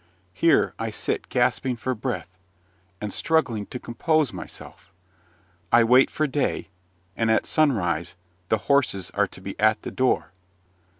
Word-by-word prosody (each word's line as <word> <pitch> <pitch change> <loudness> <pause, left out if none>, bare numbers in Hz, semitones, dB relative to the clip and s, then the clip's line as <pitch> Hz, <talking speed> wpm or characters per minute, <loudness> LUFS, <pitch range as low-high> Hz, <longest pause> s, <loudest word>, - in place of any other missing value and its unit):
Here 165 - +3
I 115 0 -2
sit 105 - -3
gasping 130 -2 +1
for 130 +3 -2
breath, 120 -5 -5 0.6
and 105 -1 -5
struggling 130 -11 0
to - - -6
compose 150 +3 0
myself. - - -9 0.8
I 120 0 +6
wait 125 +3 +5
for 155 - 0
day, 145 -6 -1 0.5
and 115 -1 0
at 110 - +3
sunrise 90 - +1 0.3
the 110 - +3
horses 120 -10 +1
are - - +1
to - - -14
be - - -6
at 110 0 +3
the - - -5
door. 130 -7 +1
120 Hz, 140 wpm, -24 LUFS, 105-135 Hz, 0.8 s, I